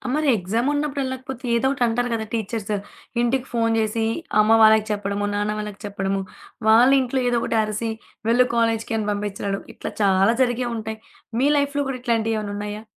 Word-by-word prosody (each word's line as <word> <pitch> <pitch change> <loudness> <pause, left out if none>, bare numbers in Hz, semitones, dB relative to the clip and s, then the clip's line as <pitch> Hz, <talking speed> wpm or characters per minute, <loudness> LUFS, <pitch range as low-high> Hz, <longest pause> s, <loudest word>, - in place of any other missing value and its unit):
మరి 305 -1 0
ఎగ్జామున్నప్పుడు 275 +9 -1
వెళ్ళకపోతే 260 -1 -6
ఏదో 265 +3 +2
ఒకటి 270 -3 -1
అంటారు 245 +2 0
కదా! 220 -1 -2
టీచర్సు 215 -1 -2 0.5
ఇంటికి 250 +2 +1
ఫోను 230 -1 +2
చేసి 220 +1 0 0.3
అమ్మ 220 +1 +5
వాళ్ళకి 220 0 +6
చెప్పడము, 205 0 -2
నాన్న 205 +1 0
వాళ్ళకి 210 -1 -6
చెప్పడము, 195 -1 -2 0.5
వాళ్ళు 245 +5 +7
ఇంట్లో 260 +1 -1
ఏదో 240 - +2
ఒకటి 230 - 0
అరిసి 215 +2 -2 0.4
వెళ్ళు 250 +2 +5
కాలేజీకి 230 0 +1
అని 210 -1 -2
పంపించడం. 200 -1 -3
ఇట్లా - - -6
చాలా 195 +2 +4
జరిగే 245 0 -1
ఉంటాయి. 220 0 -5 0.4
మీ 275 - +3
లైఫ్‌లో 285 0 0
కూడా 255 -2 -4
ఇట్లాంటియేమన్నా 225 -3 -1
ఉన్నాయా? 210 +1 -5
225 Hz, 160 wpm, -23 LUFS, 210-245 Hz, 0.5 s, వాళ్ళు